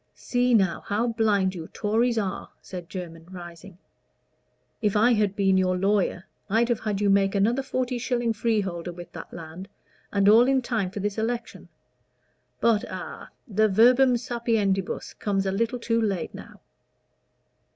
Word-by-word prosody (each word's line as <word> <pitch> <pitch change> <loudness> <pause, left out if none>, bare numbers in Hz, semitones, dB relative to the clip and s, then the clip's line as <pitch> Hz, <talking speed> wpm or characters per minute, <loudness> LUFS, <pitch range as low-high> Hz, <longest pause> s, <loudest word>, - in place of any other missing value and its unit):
"See 245 -1 +1
now, 190 -5 +2
how 220 +4 0
blind 210 -4 +1
you 165 -3 -7
Tories 230 +3 0
are," 200 -4 -3
said 180 -3 -9
Jermyn, 165 -3 -8
rising; 175 0 -10 1.0
"if 210 -2 +1
I 235 +4 +5
had 210 -3 +1
been 195 -2 +3
your 185 0 +1
lawyer, 195 -1 0 0.2
I'd 230 +4 +2
have 235 -2 +1
had 210 -3 -2
you 205 - +1
make 195 0 +3
another 225 +7 +2
forty 255 -2 -2
shilling 240 -1 0
freeholder 195 -6 -1
with 175 0 -10
that - - -9
land, 170 +3 -9 0.4
and 200 -1 +2
all 225 +4 +7
in 265 -1 +2
time 225 -6 -1
for 200 +1 -6
this 205 +2 -2
election. 235 +1 -4 0.9
But 225 -3 +3
a - - -8 0.2
the 215 0 +2
verbum 245 +5 +5
sapientibus 225 -6 -1
comes 195 -2 0
a 190 - 0
little 230 +5 -1
too 230 -1 0
late 195 -6 -2
now." - - -12
210 Hz, 155 wpm, -25 LUFS, 190-230 Hz, 1.0 s, all